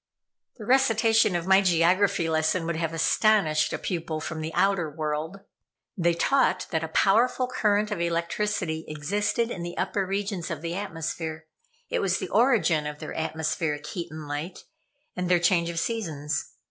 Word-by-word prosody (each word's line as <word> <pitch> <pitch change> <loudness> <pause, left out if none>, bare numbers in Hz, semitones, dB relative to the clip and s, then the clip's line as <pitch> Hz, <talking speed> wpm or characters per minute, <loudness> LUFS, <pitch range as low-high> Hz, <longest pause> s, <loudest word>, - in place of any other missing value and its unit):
The 215 - -8
recitation 225 -5 +3
of 170 -1 -1
my 190 +1 +5
geography 180 0 +3
lesson 160 +2 +1
would 170 0 -2
have 165 -1 -1
astonished 165 -1 +2
a - - -2
pupil 165 -3 -3
from 160 +1 -5
the 160 +1 -4
outer 195 -5 +2
world. 155 +4 -4 0.5
They 170 -2 +1
taught 270 +10 +2
that 160 -1 0
a - - -2
powerful 235 +10 +3
current 210 -2 +1
of 195 -5 -2
electricity 170 0 -1
existed 205 +10 -1
in 175 - -5
the 175 0 -6
upper 200 - 0
regions 195 -2 -3
of 160 -1 -5
the 170 0 -3
atmosphere. 165 -4 -4 0.5
It - - +1
was 190 -1 +1
the - - -5
origin 190 - +3
of 150 0 -6
their - - -7
atmospheric 160 -1 -2
heat 170 +2 -5
and 155 -1 -8
light, 150 +5 -5 0.5
and 180 0 -2
their 180 - +5
change 170 -1 +2
of 170 - -5
seasons. 160 -8 -2
170 Hz, 165 wpm, -26 LUFS, 160-200 Hz, 0.5 s, my